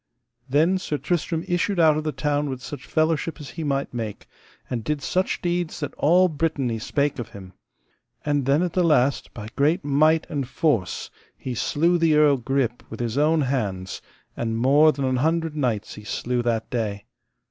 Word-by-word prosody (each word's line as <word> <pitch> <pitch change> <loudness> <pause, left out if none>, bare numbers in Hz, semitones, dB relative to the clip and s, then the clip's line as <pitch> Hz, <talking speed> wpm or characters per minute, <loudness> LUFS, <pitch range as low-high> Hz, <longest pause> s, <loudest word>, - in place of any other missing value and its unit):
Then 160 +7 +3
Sir 155 -5 -2
Tristram 165 0 -1
issued 175 +2 0
out 160 -2 +6
of 155 - -2
the 155 - -1
town 145 +1 -1
with 130 -1 -4
such 140 +6 -8
fellowship 160 +1 0
as 150 - -8
he 165 - -5
might 140 -3 -1
make, 110 -4 -5 0.4
and 120 -3 -3
did 150 +1 -2
such 185 +1 -1
deeds 175 -1 -1
that 145 -3 -4
all 180 +5 +4
Brittany 145 -7 -1
spake 145 +4 -1
of 120 - -5
him. 95 -2 -11 0.7
And 145 -3 0
then, 145 +5 +3
at 180 - -2
the 185 - +2
last, 140 -6 +2
by 110 -2 -7
great 150 +3 +2
might 155 +3 +3
and 140 -5 -3
force, 125 - 0 0.3
he 130 - -5
slew 170 +8 +1
the 165 -2 +4
Earl 150 -2 +5
Grip 125 -1 -1
with - - -8
his 120 -1 -2
own 155 +2 +3
hands, 105 -9 -2 0.3
and 115 -1 -2
more 145 +6 +5
than 140 -1 -3
an 130 -1 +1
hundred 160 +3 0
knights 125 -8 -1
he 105 - -10
slew 120 +4 -2
that 115 -2 -1
day. 105 -4 -2
145 Hz, 185 wpm, -24 LUFS, 125-160 Hz, 0.7 s, out